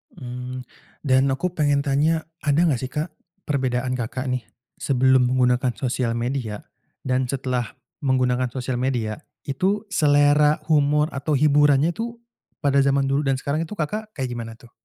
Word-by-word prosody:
Mmm. 125 Hz, 0 st, -6 dB, 0.4 s
Dan 135 Hz, -1 st, +3 dB
aku 155 Hz, +7 st, -1 dB
pengen 145 Hz, -4 st, +1 dB
tanya, 155 Hz, +3 st, +1 dB, 0.2 s
ada 150 Hz, +2 st, +2 dB
nggak 150 Hz, -8 st, +2 dB
sih, 130 Hz, +1 st, -5 dB
Kak, 150 Hz, +5 st, -3 dB, 0.3 s
perbedaan 130 Hz, -3 st, -1 dB
Kakak 130 Hz, +2 st, -4 dB
nih 125 Hz, -1 st, -2 dB, 0.4 s
sebelum 130 Hz, -1 st, +3 dB
menggunakan 125 Hz, 0 st, +2 dB
sosial 125 Hz, -2 st, -1 dB
media 120 Hz, -3 st, -3 dB, 0.4 s
dan 130 Hz, 0 st, 0 dB
setelah 125 Hz, -3 st, -2 dB, 0.3 s
menggunakan 130 Hz, -2 st, +2 dB
sosial 130 Hz, -1 st, -3 dB
media, 120 Hz, -3 st, -1 dB, 0.3 s
itu 190 Hz, +11 st, 0 dB
selera 150 Hz, -2 st, +4 dB
humor 150 Hz, 0 st, +3 dB
atau 140 Hz, +2 st, -2 dB
hiburannya 145 Hz, +1 st, +4 dB
tuh 235 Hz, +1 st, -5 dB, 0.4 s
pada 140 Hz, -1 st, +3 dB
zaman 140 Hz, 0 st, +2 dB
dulu 140 Hz, +2 st, +1 dB
dan 135 Hz, -, +3 dB
sekarang 145 Hz, +4 st, -1 dB
itu, 165 Hz, -, -7 dB
Kakak 210 Hz, +6 st, -3 dB
kayak 130 Hz, -3 st, -3 dB
gimana 115 Hz, -2 st, -5 dB
tuh? 120 Hz, -, -17 dB
135 Hz, 150 wpm, -23 LUFS, 125-150 Hz, 0.4 s, selera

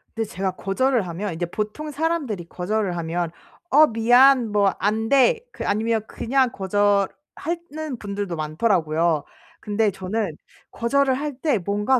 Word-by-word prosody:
근데 225 Hz, -1 st, -2 dB
제가 190 Hz, +1 st, -2 dB
거절을 210 Hz, +4 st, 0 dB
하면 175 Hz, +3 st, -4 dB
이제 170 Hz, +2 st, -2 dB
보통 215 Hz, -, -4 dB
사람들이 290 Hz, -, -2 dB
거절을 190 Hz, 0 st, -2 dB
하면 170 Hz, 0 st, -2 dB, 0.4 s
"어 310 Hz, -1 st, +7 dB
미안." 245 Hz, +1 st, +5 dB
뭐 200 Hz, -2 st, +3 dB
"안 220 Hz, +2 st, 0 dB
돼." 280 Hz, -, +4 dB
그 -, -, -6 dB
아니면 220 Hz, +2 st, +1 dB
그냥 260 Hz, +1 st, +1 dB
거절하는 255 Hz, -, -2 dB
분들도 200 Hz, -3 st, -4 dB
많더라고요. 160 Hz, -1 st, +1 dB, 0.4 s
근데 210 Hz, 0 st, 0 dB
저는 195 Hz, 0 st, -3 dB, 0.4 s
거절을 265 Hz, +3 st, +1 dB
할 290 Hz, +1 st, -4 dB
때 295 Hz, -7 st, +2 dB
뭔가 205 Hz, +7 st, +1 dB
210 Hz, 285 characters per minute, -23 LUFS, 190-265 Hz, 0.4 s, 어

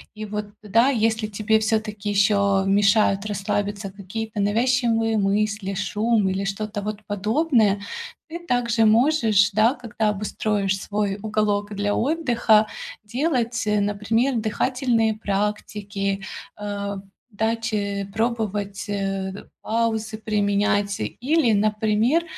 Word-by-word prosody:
И 215 Hz, -, -6 dB
вот 210 Hz, 0 st, -4 dB, 0.2 s
тогда, 230 Hz, +5 st, +3 dB
если 225 Hz, -4 st, +1 dB
тебе 215 Hz, +1 st, +1 dB
все-таки 215 Hz, -2 st, -1 dB
еще 200 Hz, -1 st, +3 dB
мешают 200 Hz, 0 st, +3 dB
расслабиться 205 Hz, 0 st, -2 dB
какие-то 210 Hz, +3 st, -6 dB
навязчивые 225 Hz, +1 st, +2 dB
мысли, 205 Hz, 0 st, 0 dB
шум 210 Hz, +2 st, +1 dB
или 195 Hz, +1 st, -2 dB
что-то 205 Hz, +1 st, -3 dB
вот 210 Hz, 0 st, -5 dB
подобное, 215 Hz, 0 st, +1 dB, 0.5 s
ты 340 Hz, -, -6 dB
также 235 Hz, -8 st, +1 dB
можешь, 220 Hz, -4 st, +4 dB
да, 220 Hz, +5 st, +3 dB
когда 235 Hz, -3 st, -3 dB
обустроишь 205 Hz, -1 st, -1 dB
свой 205 Hz, -1 st, -2 dB
уголок 210 Hz, -1 st, -1 dB
для 205 Hz, +1 st, 0 dB
отдыха, 240 Hz, -7 st, +2 dB, 0.4 s
делать, 235 Hz, -2 st, -1 dB
э, 210 Hz, -1 st, +2 dB
например, 225 Hz, +6 st, 0 dB
дыхательные 225 Hz, 0 st, +1 dB
практики, 200 Hz, -1 st, -2 dB, 0.3 s
э, 200 Hz, -1 st, -4 dB, 0.3 s
дать, 225 Hz, +1 st, -2 dB
э, 200 Hz, -1 st, -1 dB
пробовать, 210 Hz, -3 st, -2 dB
э, 195 Hz, -1 st, -2 dB, 0.3 s
паузы 220 Hz, -1 st, -1 dB
применять 205 Hz, -1 st, 0 dB
или, 250 Hz, -, +1 dB
например, 215 Hz, +8 st, +2 dB
210 Hz, 110 wpm, -23 LUFS, 200-225 Hz, 0.5 s, можешь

